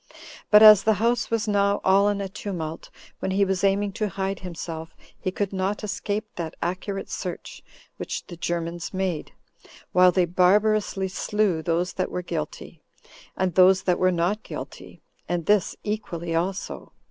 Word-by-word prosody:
But 210 0 +8
as 215 -2 +10
the 220 +1 +2
house 230 +2 +1
was 230 -1 -1
now 200 -1 +2
all 195 +2 +4
in 200 -1 -1
a 195 - -3
tumult, 180 -5 -6 0.3
when - - -2
he 195 +1 +2
was 190 -1 -1
aiming 200 +1 +2
to 210 +1 -2
hide 195 0 -3
himself, 165 -2 -7 0.2
he - - -3
could 200 +1 -3
not 195 +3 -2
escape 205 +1 -3
that 165 -2 -4
accurate 190 +3 -3
search - - -6 0.4
which - - -5
the 175 - -9
Germans 170 +1 -4
made, 185 -5 -2 0.6
while 180 0 +6
they 180 -1 +2
barbarously 195 +2 +2
slew 190 -2 0
those 170 +2 -1
that 185 - -2
were 180 - -4
guilty, 160 -1 -6 0.6
and 185 -2 0
those 185 +2 +5
that 180 -2 +1
were 185 0 +3
not 180 +5 0
guilty, - - -9 0.3
and 175 -2 -1
this 205 -2 +2
equally 175 -6 -4
also. 180 +4 -3
190 Hz, 160 wpm, -25 LUFS, 175-205 Hz, 0.6 s, as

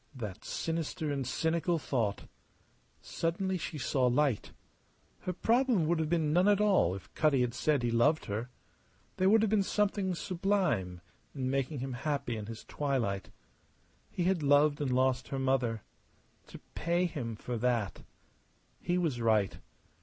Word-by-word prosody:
That 105 -7 -6
sinister 160 -2 -3
and 135 -3 -2
cynical 165 +4 0
thought! 115 -9 -1 0.8
Suddenly 185 +3 -2
she 155 - -5
saw 130 -2 +1
light. 125 -2 +1 0.7
Her 185 - -3
problem 230 -2 +2
would 165 +1 +1
have 155 -1 -1
been 160 -3 +1
none 180 +4 +4
at 205 -1 +4
all 195 - +3
if 90 -4 -11
Cutty 150 -4 +3
had 120 -1 0
said 150 -5 +1
he 120 - +1
loved 145 +7 +3
her. 110 +5 -4 0.7
There 185 +1 +3
would 220 +1 +5
have 215 - +1
been 215 -2 +4
something 195 -2 0
sublime 170 - -1 0.3
in 130 -2 -2
making 135 0 -1
him 135 0 -4
happy 140 -1 -2
in 105 -1 -6
his 115 0 -8
twilight. 125 -10 -2 0.8
He 180 - -2
had 180 -1 +1
loved 145 +1 +4
and 140 - 0
lost 130 -1 +1
her 135 - -4
mother. 130 -5 0 0.6
To - - -10 0.2
pay 170 +2 +1
him 125 -9 -4
for 120 +3 -5
that! 115 -4 0 0.8
He 175 +1 -1
was 155 -9 -1
right. 110 -3 +2
145 Hz, 155 wpm, -31 LUFS, 120-175 Hz, 0.8 s, would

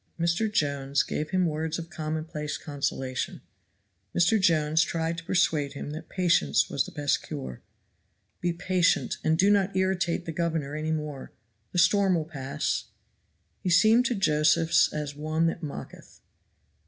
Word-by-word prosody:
Mr. 170 +6 +1
Jones 140 -5 +1
gave 155 - -3
him 185 -1 +2
words 160 0 -2
of 170 0 -8
commonplace 155 -1 -4
consolation. 135 -3 -3 0.8
Mr. 185 +5 +4
Jones 160 -3 +3
tried 165 0 -1
to - - -12
persuade 155 -5 +1
him 145 0 -6
that 160 +1 -8
patience 170 - +2
was - - +1
the - - -9
best 145 -1 0
cure. 65 -1 -7 0.8
"Be 175 - 0
patient, 180 +1 +1
and 160 0 +2
do 195 +4 +4
not 195 -2 +2
irritate 185 -2 0
the 165 - -4
governor 160 -3 -2
any 155 +1 -2
more 150 -3 -4 0.4
the - - -4
storm 195 +1 +4
will 160 -2 -1
pass." 135 -4 -3 0.7
He 185 - -2
seemed 220 +7 +5
to 245 - -1
Josephs 155 -2 +3
as 150 -1 -4
one 155 +2 0
that 165 +1 -1
mocketh. 150 -4 -9
160 Hz, 150 wpm, -27 LUFS, 150-175 Hz, 0.8 s, seemed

